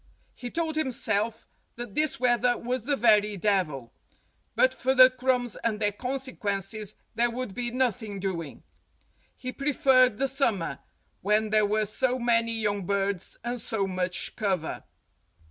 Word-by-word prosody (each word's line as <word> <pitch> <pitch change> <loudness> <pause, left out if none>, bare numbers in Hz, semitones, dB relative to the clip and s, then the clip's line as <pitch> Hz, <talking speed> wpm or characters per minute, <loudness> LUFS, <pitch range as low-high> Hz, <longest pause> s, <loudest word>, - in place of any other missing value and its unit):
He 245 - -7
told 320 +2 -2
himself 230 -6 -1 0.3
that 240 -4 -7
this 300 -1 0
weather 245 -1 +2
was 245 -1 -3
the 285 +1 +1
very 210 -3 +3
devil. 175 - 0 0.6
But - - +4
for 265 +1 0
the 255 0 +8
crumbs 255 -2 0
and 220 -2 -2
their 205 -1 +1
consequences 215 -4 -3 0.2
there 235 +1 +2
would 245 -3 -5
be 240 +3 -3
nothing 240 -5 -1
doing. 170 -6 -4 0.7
He 255 - -5
preferred 265 -4 +3
the 270 - +1
summer, 240 - 0 0.4
when 210 +2 +1
there 215 -1 +4
were 215 +1 +1
so 250 +5 0
many 230 -1 +1
young 205 -4 -1
birds 200 -2 -1
and 240 0 -3
so 210 -2 -1
much 185 -1 -2
cover. 190 -7 -2
230 Hz, 145 wpm, -27 LUFS, 205-255 Hz, 0.7 s, the